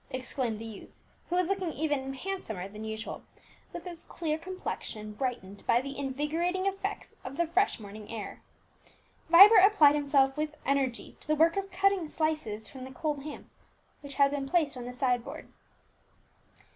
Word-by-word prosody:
exclaimed 255 -3 -3
the 225 - -7
youth, 220 -3 -9 0.4
who 355 - 0
was 365 -1 +2
looking 380 -3 -1
even 280 -3 -2
handsomer 265 - -4
than 210 +2 -9
usual, 220 +1 -5 0.5
with 345 0 -7
his 345 -2 -8
clear 315 -3 -2
complexion 315 - -6
brightened 210 -5 -4
by 235 - +5
the 275 +2 -6
invigorating 300 +7 -1
effects 390 0 -3
of 260 +3 -7
the 340 - +2
fresh 360 -2 +1
morning 210 0 -10
air. 220 -3 -6 0.9
Vibert 390 +4 +10
applied 355 -8 +7
himself 280 -2 +3
with 305 0 -3
energy 270 -3 -1
to - - -10
the 305 - +3
work 325 +2 +4
of 395 0 -2
cutting 390 -3 +2
slices 300 - -2
from 260 -2 -9
the 260 - -7
cold 295 +1 -2
ham 300 - -8 0.5
which 280 -1 -8
had 280 -1 +4
been 275 -1 -3
placed 315 -5 +2
on 245 -1 -6
the 250 - -6
side 250 -2 +1
board. - - -9
285 Hz, 170 wpm, -30 LUFS, 250-340 Hz, 0.9 s, Vibert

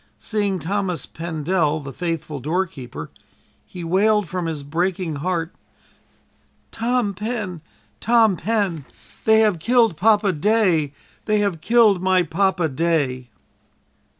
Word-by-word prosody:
Seeing 205 -3 -1
Thomas 185 0 -2
Pendel, 160 -1 -1
the 140 -2 -8
faithful 165 -3 -4
doorkeeper, 140 - -4 0.6
he 180 - -8
wailed 200 +4 +2
from 180 +1 -3
his 155 -3 -4
breaking 170 +2 -2
heart: 170 +2 -2 1.2
"Tom 235 -2 0
Pen, 210 -4 -4 0.4
Tom 225 -4 +4
Pen, 190 -6 -1 0.4
they 220 0 +5
have 210 -6 +2
killed 230 0 +3
Papa 210 0 +3
day! 175 -4 +2 0.3
They 215 -1 +2
have 190 -6 -1
killed 225 -4 +4
my 185 -1 +3
Papa 180 -1 +1
day!" 140 -5 -1
180 Hz, 115 wpm, -21 LUFS, 160-210 Hz, 1.2 s, they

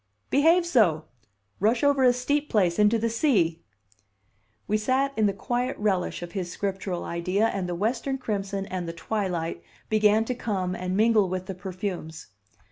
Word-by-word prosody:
"Behave 330 +5 +4
so. 190 - +3 0.5
Rush 225 +5 +2
over 285 -2 +3
a 250 - +7
steep 285 +4 -1
place 185 -6 +2
into 210 +2 +4
the 230 +1 0
sea." 215 - +1 1.1
We 210 - +1
sat 260 +6 +1
in 215 -1 +3
the - - +2
quiet 245 +5 -2
relish 195 -4 -1
of 175 - -7
his 180 -3 -4
Scriptural 190 -2 -3
idea, 180 +5 0
and 185 -2 -3
the 175 - -2
western 235 +7 -1
crimson 200 -5 -3
and 185 -3 -4
the 165 - -4
twilight 170 - -3 0.3
began 215 +1 +3
to 250 - -1
come 195 -7 -2
and 185 +1 -3
mingle 215 -3 +4
with 185 0 -3
the 190 - -5
perfumes. 185 - -6
205 Hz, 165 wpm, -26 LUFS, 180-235 Hz, 1.1 s, a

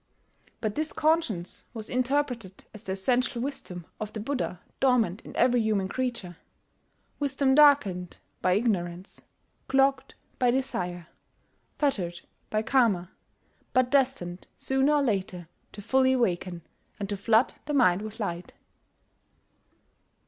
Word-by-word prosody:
But 215 -2 -1
this 310 +4 -3
conscience 300 - 0
was 220 -1 -6
interpreted 250 -6 -1
as 215 - -10
the 190 -4 -4
essential 245 +5 0
wisdom 190 - -5
of 215 -1 -4
the 220 - -6
Buddha 240 -6 -3 0.2
dormant 230 -7 +2
in - - -12
every 245 -1 +3
human 210 -3 +1
creature, 235 -7 -3 0.8
wisdom 275 -1 +1
darkened 265 - +4 0.2
by 185 - +3
ignorance, 185 -4 -1 0.5
clogged 270 0 +2 0.2
by 250 - +4
desire, 180 -9 -2 0.7
fettered 185 - -1 0.3
by 215 0 0
Karma, 215 -9 +2 0.6
but 255 -1 +3
destined 255 -11 0
sooner 270 +2 +2
or 290 -1 +3
later 190 -7 -2 0.3
to 205 - -9
fully 260 +3 +3
awaken, 180 -8 -1 0.4
and 200 - -3
to 205 - -1
flood 220 +5 +3
the 295 - -2
mind 185 -8 +4
with 215 +2 -8
light. 175 -4 -4
225 Hz, 125 wpm, -27 LUFS, 185-265 Hz, 0.8 s, darkened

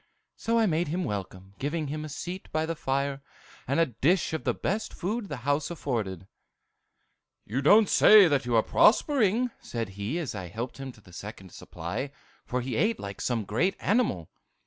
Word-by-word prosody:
So 230 +1 0
I 225 - +4
made 170 -2 +1
him 175 +5 -1
welcome, 95 - -5
giving 150 +3 -2
him 155 +1 -4
a 155 - -6
seat 180 +6 -6
by 155 0 0
the 165 +1 -3
fire, 140 -1 -1 0.5
and 140 +5 +1
a 165 - +5
dish 155 - +1
of 160 - -3
the - - +2
best 210 +4 -2
food 205 +3 -3
the 145 - -4
house 145 +1 +1
afforded. 110 - -3 1.2
"'You 125 +6 -2
don't 205 +9 +6
say 210 0 +8
that 145 -4 +1
you're 120 -2 +2
prospering,' 245 -1 +3
said 115 -3 -4
he, 100 - -4
as 170 -5 -3
I 95 -4 -6
helped 115 +9 -6
him 135 -1 -6
to 105 - -19
the 90 -3 -18
second 95 -1 -9
supply; 140 - -5 0.4
for 125 +1 -1
he 125 -1 -3
ate 225 +2 +1
like 100 -1 -7
some 120 -3 0
great 160 - +1
animal. 205 - 0
145 Hz, 185 wpm, -28 LUFS, 110-180 Hz, 1.2 s, say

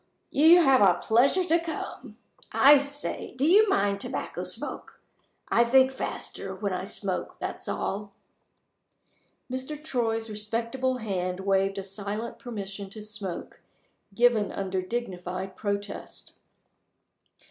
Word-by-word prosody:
You 330 +4 +7
have 270 -3 +6
got 190 -4 +4
a - - -14
pleasure 260 +11 +4
to 340 -1 +3
come. 330 -1 -6 0.3
I 285 +1 +7
say, 285 -1 -4
do 260 +3 0
you 410 +6 +6
mind 200 - +1
tobacco - - -4
smoke? - - -6 0.5
I 235 - +5
think 260 +2 +5
faster 265 - -5
while - - -2
I - - -3
smoke - - -3
that's - - -5
all." 200 +1 -3 1.4
Mr. 260 +4 -5
Troy's 225 -6 -1
respectable 230 +5 -2
hand 185 -5 -3
waved 195 0 +1
a 195 - -3
silent 205 +4 -5
permission 200 -4 -6
to 215 +2 -9
smoke, 210 -4 -6 0.5
given 235 -3 +3
under 190 -1 -2
dignified 185 -3 -4
protest. 205 -1 -5
225 Hz, 125 wpm, -27 LUFS, 195-260 Hz, 1.4 s, You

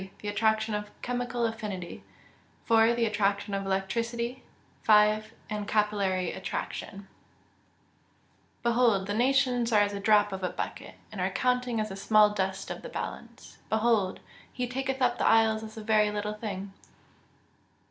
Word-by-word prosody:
The 205 - -2
attraction 220 +1 +1
of 210 0 -3
chemical 245 -1 -1
affinity. 210 -6 -5 0.6
4. 225 +1 +4
The 235 -1 +1
attraction 205 -1 0
of 195 0 -2
electricity. 230 +6 -2 0.4
5. 215 0 +4 0.2
And 210 -1 -4
capillary 200 -4 +1
attraction. 195 +1 -5
[Verse: 195 - -32
"Behold, 235 -5 +3
the 205 - -3
nations 245 0 +2
are 210 -2 +5
as 205 0 +1
a 200 - -4
drop 205 0 +4
of 190 - -5
a 180 - 0
bucket, - - -6 0.2
and - - -5
are - - +1
counted 250 -2 0
as 215 0 -1
the 195 - -6
small 210 +1 +4
dust 190 -2 -2
of - - -6
the - - -8
balance: - - -7
behold, 220 -4 +1 0.3
he 250 -1 -3
taketh 265 +1 -2
up 245 -1 +2
the - - +2
isles 220 -1 +4
as 220 0 -10
a 220 - -6
very 215 -1 +3
little 210 0 -3
thing." 200 -3 -6
215 Hz, 155 wpm, -28 LUFS, 205-235 Hz, 0.6 s, are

